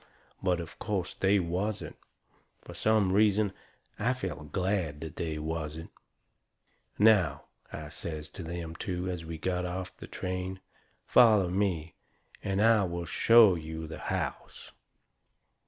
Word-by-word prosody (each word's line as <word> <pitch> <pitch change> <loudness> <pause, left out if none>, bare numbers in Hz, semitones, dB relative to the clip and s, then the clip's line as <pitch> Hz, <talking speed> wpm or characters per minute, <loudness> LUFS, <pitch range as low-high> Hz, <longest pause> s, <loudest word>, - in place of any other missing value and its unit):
But, 90 -2 +1
of 85 -2 -8
course, 100 -4 -2
they 100 +1 +3
wasn't. 95 +4 -2 0.7
Fur - - -10
some 105 -4 +2
reason 105 -1 +3 0.5
I 125 - +2
felt 80 - -6
glad 90 -6 -1
they 80 0 -4
wasn't. 80 +1 -4 1.1
"Now," 100 -9 +4 0.3
I 75 -1 -7
says 75 0 -6
to - - -8
them 85 -1 -5
two, 90 -1 -3
as 90 -3 -3
we 80 0 -6
got 90 +2 -1
off 90 +1 -4
the - - -10
train, 95 +1 -4 0.5
"foller 105 -7 +5
me 90 -5 -1 0.5
and 100 +1 +1
I 115 -2 +5
will 85 -1 -4
show 115 +1 +6
you 80 -1 -5
the 80 - -8
house." - - -4
90 Hz, 130 wpm, -30 LUFS, 80-100 Hz, 1.1 s, show